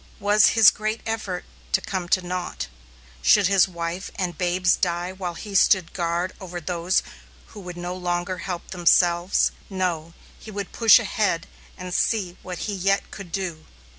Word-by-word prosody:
Was 205 +1 +5
his 225 -2 +9
great 215 +1 -3
effort 210 -5 -3 0.3
to - - +5
come 185 -3 -4
to 185 -1 +2
naught? 180 0 -4 0.6
Should 195 - +5
his 195 0 +4
wife 170 +1 -5
and 180 -3 -2
babes 180 +1 +2
die 175 0 -1
while 185 -2 -5
he 205 +2 -8
stood 190 -2 +4
guard 175 +1 -1
over 180 -2 -6
those 175 +2 0 0.5
who 215 - -11
would 180 -2 -8
no 175 +1 -4
longer 180 0 -2
help 180 -2 -5
themselves? 175 0 +3 0.2
No, 175 -4 -2 0.2
he - - -11
would 200 -2 -5
push 225 -2 +7
ahead 205 -6 0 0.3
and 180 -1 -6
see 190 -4 0
what 180 -1 -6
he 210 - -3
yet 195 +1 0
could 195 -4 -9
do! 170 -4 -4
180 Hz, 165 wpm, -24 LUFS, 175-195 Hz, 0.6 s, his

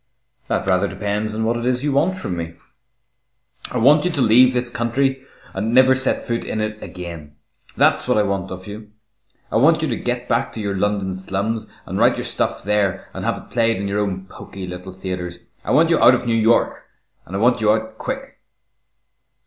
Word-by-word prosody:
"That - - -1
rather 95 +1 +2
depends 105 +1 -2
upon 110 0 -1
what 115 +1 +1
it 120 - -4
is 125 +1 0
you 145 - +1
want 170 +7 +1
from 95 - -4
me?" 85 -1 -5 1.1
"I - - -3
want 145 +6 +5
you 180 - +1
to 165 -5 -3
leave 125 +3 +6
this 125 -1 -1
country 130 +3 -1 0.3
and 110 +5 -1
never 130 0 +7
set 130 0 0
foot 115 0 -2
in 110 - -3
it 110 0 -3
again. 85 -5 -8 0.4
That's - - +3
what - - +2
I 105 - +4
want 100 -2 -2
of 95 0 -8
you. 105 +1 -9 0.6
I - - +2
want 155 +6 +4
you - - +1
to 120 - -1
get 125 +1 -3
back 115 0 0
to - - -6
your 100 -2 -2
London 100 -1 0
slums 100 +4 -3 0.2
and - - -4
write - - +4
your - - -4
stuff - - -2
there 100 -2 0
and - - -6
have - - 0
it - - -13
played 115 -2 +2
in 100 +1 -3
your 100 +1 -1
own 95 -2 -2
poky 95 0 -9
little 90 +1 -7
theatres. 90 -2 -7
I - - -6
want 160 +4 +4
you 165 - +4
out 125 - +7
of 125 - -4
New 115 - +1
York, 115 +1 +2 0.4
and 95 - -7
I - - -1
want 120 +1 +3
you 105 -1 +4
out 110 0 -2
quick." 270 +1 -5
110 Hz, 215 wpm, -21 LUFS, 95-125 Hz, 1.1 s, never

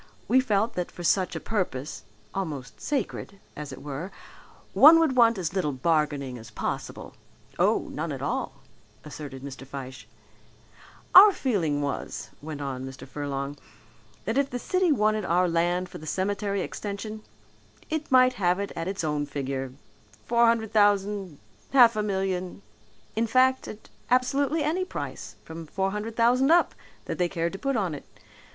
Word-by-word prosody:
We 260 - +5
felt 225 -2 +1
that 180 -3 -3
for 175 - -9
such 185 +1 +2
a - - -2
purpose, 175 - -3 0.3
almost 150 -10 -5
sacred 215 -7 -3 0.2
as 150 -2 -7
it 130 +1 -10
were, 150 +7 -5 0.6
one 315 +4 +9
would 315 -5 +2
want 230 -3 +5
as 180 -2 -3
little 185 -6 0
bargaining 140 -3 0
as 115 +1 -11
possible." 110 - -5 0.5
"Oh, - - +2
none - - -4
at - - -5
all," - - -2 0.5
assented 145 -3 -8
Mr. 135 -1 -8
Fyshe. 130 -1 -8 1.1
"Our 405 +3 +11
feeling 170 - 0
was," 140 - -4
went 150 -1 -6
on 135 -2 -4
Mr. 135 0 -9
Furlong, 140 +1 -4 0.7
"that 225 +5 +1
if 275 -1 +1
the 245 - -3
city 365 +6 +1
wanted 215 -5 +2
our 180 +1 +2
land 175 +2 +1
for - - -10
the 155 - -10
cemetery 200 +2 -1
extension, 215 +3 -5 0.7
it 315 -1 -2
might 255 0 +6
have 180 +1 +2
it 200 - -3
at 165 +1 -3
its 190 -2 -3
own 150 -2 -1
figure 135 -2 -4 0.5
four 235 0 +4
hundred 230 -2 +1
thousand, 205 -5 +2 0.4
half 240 -4 +7
a 215 - 0
million, 190 -2 -2 0.5
in 230 +1 +1
fact 260 +3 +3
at 215 - -10 0.2
absolutely 275 +5 +2
any 330 +5 0
price, 370 - -6
from 160 0 -9
four 190 +4 -1
hundred 210 +2 -4
thousand 245 +4 +3
up, 345 +2 +4 0.3
that - - -4
they 175 -1 +2
cared 170 -1 -2
to 195 - -6
put 275 -1 -1
on 190 -6 -1
it. 145 - -8
195 Hz, 160 wpm, -26 LUFS, 150-230 Hz, 1.1 s, Our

